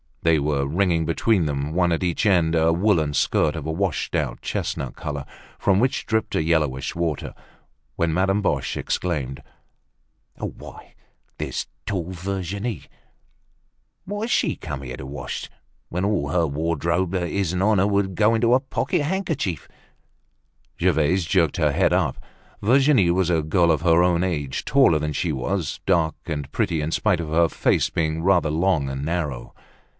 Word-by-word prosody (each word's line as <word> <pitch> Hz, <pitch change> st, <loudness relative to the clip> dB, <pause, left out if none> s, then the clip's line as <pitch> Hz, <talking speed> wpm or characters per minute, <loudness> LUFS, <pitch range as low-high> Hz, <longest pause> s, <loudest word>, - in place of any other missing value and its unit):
They 80 Hz, -2 st, +4 dB
were 70 Hz, -1 st, 0 dB
wringing 85 Hz, +1 st, +1 dB
between 85 Hz, +3 st, +1 dB
them, 70 Hz, 0 st, -2 dB
one 85 Hz, 0 st, +2 dB
at 85 Hz, -, 0 dB
each 90 Hz, +2 st, 0 dB
end, 85 Hz, -5 st, +3 dB
a 80 Hz, 0 st, +3 dB
woolen 85 Hz, -5 st, +2 dB
skirt 75 Hz, +2 st, +1 dB
of 80 Hz, -3 st, -5 dB
a 80 Hz, -, -2 dB
washed 90 Hz, 0 st, -1 dB
out -, -, -2 dB
chestnut -, -, -3 dB
color, 70 Hz, -2 st, -5 dB, 0.3 s
from 100 Hz, -1 st, +3 dB
which 130 Hz, +3 st, 0 dB
dribbled 110 Hz, -1 st, -1 dB
a -, -, +1 dB
yellowish 75 Hz, -5 st, 0 dB
water, 85 Hz, -4 st, -2 dB, 0.6 s
when 85 Hz, -1 st, 0 dB
Madame 95 Hz, +3 st, +2 dB
Boche 100 Hz, -, -1 dB
exclaimed: 70 Hz, -7 st, -2 dB, 1.0 s
"Why, -, -, -9 dB, 0.4 s
there's -, -, -3 dB, 0.2 s
tall 90 Hz, -3 st, -2 dB
Virginie! 95 Hz, -, -4 dB, 1.2 s
What 205 Hz, +2 st, -4 dB
has 230 Hz, +2 st, -2 dB
she -, -, +2 dB
come 70 Hz, 0 st, -6 dB
here 65 Hz, -2 st, -6 dB
to 65 Hz, -, -8 dB
wash, 70 Hz, +2 st, -6 dB, 0.4 s
when 90 Hz, +3 st, -1 dB
all 100 Hz, -9 st, 0 dB
her 85 Hz, +1 st, +2 dB
wardrobe 85 Hz, +4 st, -1 dB
that 90 Hz, -3 st, -1 dB
isn't 95 Hz, -2 st, -1 dB
on 105 Hz, 0 st, +3 dB
her 95 Hz, -, +3 dB
would 100 Hz, -2 st, 0 dB
go 110 Hz, +3 st, +3 dB
into 115 Hz, +1 st, +3 dB
a 130 Hz, -, +5 dB
pocket 145 Hz, +5 st, -1 dB
handkerchief?" 150 Hz, -, -2 dB, 1.1 s
Gervaise 85 Hz, +1 st, +2 dB
jerked 80 Hz, -3 st, +2 dB
her -, -, +2 dB
head -, -, +2 dB
up. -, -, +1 dB, 0.4 s
Virginie 125 Hz, -5 st, +4 dB
was 90 Hz, 0 st, +1 dB
a 80 Hz, -2 st, +2 dB
girl 85 Hz, +2 st, +3 dB
of 75 Hz, -3 st, +1 dB
her 85 Hz, 0 st, +4 dB
own 90 Hz, -1 st, +2 dB
age, 75 Hz, -7 st, -2 dB
taller 135 Hz, -, +4 dB
than 75 Hz, 0 st, -2 dB
she 85 Hz, +2 st, -1 dB
was, 75 Hz, +4 st, -2 dB
dark 85 Hz, -4 st, +2 dB
and 75 Hz, -3 st, -4 dB
pretty 80 Hz, +1 st, 0 dB
in 75 Hz, +2 st, -2 dB
spite 95 Hz, 0 st, +1 dB
of 80 Hz, -2 st, -4 dB
her 85 Hz, +2 st, +3 dB
face -, -, +1 dB
being 80 Hz, 0 st, -1 dB
rather 90 Hz, -4 st, +3 dB
long 80 Hz, -3 st, +1 dB
and 65 Hz, +1 st, -4 dB
narrow. 75 Hz, -5 st, -3 dB
85 Hz, 165 wpm, -23 LUFS, 80-95 Hz, 1.2 s, a